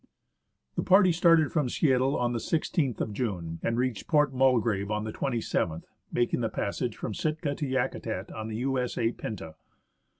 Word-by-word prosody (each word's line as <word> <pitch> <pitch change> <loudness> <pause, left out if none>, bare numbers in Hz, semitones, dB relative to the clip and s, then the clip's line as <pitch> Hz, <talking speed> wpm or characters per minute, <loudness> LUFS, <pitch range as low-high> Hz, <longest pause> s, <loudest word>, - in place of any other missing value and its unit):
The - - +2
party 190 -1 +5
started 165 -2 +4
from 150 -6 +1
Seattle 135 0 +2
on 120 0 0
the 120 - -1
i6th 150 - 0
of 105 - -2
June, 90 -8 -3
and 115 - 0
reached 125 -4 -1
Port 150 -3 +3
Mulgrave 120 -6 +2
on 105 0 -1
the 110 - -5
27th, 110 -10 -1 0.3
making 120 0 +1
the 115 - 0
passage 110 +3 -3
from 110 - -4
Sitka 155 +2 -1
to 145 0 -3
Yakutat 130 -1 -2
on 110 0 -5
the 110 - -5
U.S.A. 125 -2 0
Pinta. 95 -10 -6
125 Hz, 165 wpm, -28 LUFS, 110-140 Hz, 0.3 s, party